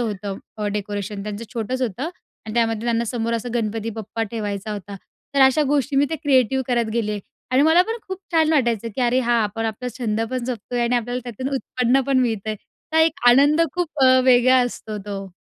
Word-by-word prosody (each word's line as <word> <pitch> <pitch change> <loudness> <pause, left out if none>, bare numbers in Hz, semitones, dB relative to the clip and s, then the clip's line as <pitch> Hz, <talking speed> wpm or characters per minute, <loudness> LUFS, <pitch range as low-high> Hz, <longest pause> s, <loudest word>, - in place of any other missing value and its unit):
होतं 205 -4 -3 0.2
अ, 210 -1 -2
डेकोरेशन 205 0 -4
त्यांचं, 210 +2 -5
छोटंच 250 +3 -2
होतं 245 +4 -2 0.4
आणि 215 - -6
त्यामध्ये 225 -1 0
त्यांना 235 0 +1
समोर 230 0 -2
असं 230 +1 -3
गणपती 225 0 -2
बाप्पा 220 +1 -5
ठेवायचा 210 -2 -4
होता. 200 0 -7 0.4
तर 275 - +3
अशा 265 +3 +5
गोष्टी 280 -1 +1
मी 280 - +5
त्या 320 - -2
क्रिएटिव्ह 265 -2 +3
करत 235 -3 0
गेले 210 -3 -1 0.3
आणि 260 +2 +4
मला 320 +3 +6
पण 455 - -1
खूप 380 0 -4
छान 320 -1 +3
वाटायचं 235 -6 +1
की - - -3
अरे 245 +1 +3
हा, 240 -1 0
आपण 225 +2 -3
आपला 225 +3 -4
छंद 220 -2 -1
पण 255 -2 -2
जपतोय 245 0 -3
आणि 240 +1 +2
आपल्याला 245 +2 -2
त्यातून 245 +3 -4
उत्पन्न 255 0 +1
पण 270 -2 +3
मिळतंय. 220 -3 0 0.4
तर 320 - +3
एक 320 +2 +3
आनंद 285 +6 +5
खूप 315 -5 -2
अ, 255 0 +6
वेगळा 255 0 +5
असतो 220 -3 -6
तो. 195 -1 -5
235 Hz, 200 wpm, -22 LUFS, 215-260 Hz, 0.4 s, मला